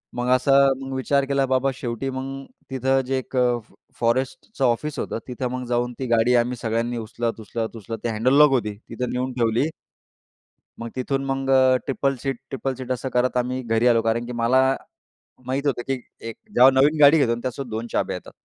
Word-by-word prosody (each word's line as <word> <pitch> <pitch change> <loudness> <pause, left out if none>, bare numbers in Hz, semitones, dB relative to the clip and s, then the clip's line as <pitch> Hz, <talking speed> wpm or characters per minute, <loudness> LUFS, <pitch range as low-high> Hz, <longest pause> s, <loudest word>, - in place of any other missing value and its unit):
मग 120 0 -2
असं 135 +2 +4
मग 135 0 -6
विचार 140 +1 +1
केला 140 0 +1
बाबा 130 +1 +1
शेवटी 125 0 -4
मग 135 +1 -5 0.2
तिथं 135 0 +1
जे 130 +1 -1
एक 130 0 -6
फ 120 -3 0 0.3
फॉरेस्टचं 130 - -1
ऑफिस 140 +5 0
होतं - - -3
तिथं 125 0 -3
मग 125 0 -4
जाऊन 120 0 0
ती 130 - -2
गाडी 120 +1 +3
आम्ही 120 +1 +1
सगळ्यांनी 115 +1 -2
उचलत-उचलत-उचलत 115 -1 -4
ते 120 - 0
हँडल 115 +4 +1
लॉक 150 -1 +8
होती 110 -6 0
तिथं 125 - -3
नेऊन 130 +1 -2
ठेवली. 120 +4 +1 1.1
मग 115 - -5
तिथून 135 +1 -1
मग 135 0 -2 0.4
ट्रिपल 135 0 0
सीट 135 -3 -2
ट्रिपल 135 0 -3
सीट 130 0 -6
असं 130 +1 -2
करत 125 +1 +1
आम्ही 125 +1 -1
घरी 115 +1 +2
आलो 115 -2 +4
कारण 115 +1 0
की 125 - -7
मला 125 +3 +4 0.9
माहीत 135 +2 -2
होतं 125 -3 0
की 135 - +1 0.4
एक 115 - -8 0.2
जेव्हा 130 +2 +8
नवीन 140 +4 +4
गाडी 145 +2 +8
घेतो 130 -6 +2
आणि 115 - -2
त्यासोबत 130 0 -4
2 110 +2 -4
चाब्या - - 0
येतात. - - -9
125 Hz, 190 wpm, -23 LUFS, 120-135 Hz, 1.1 s, लॉक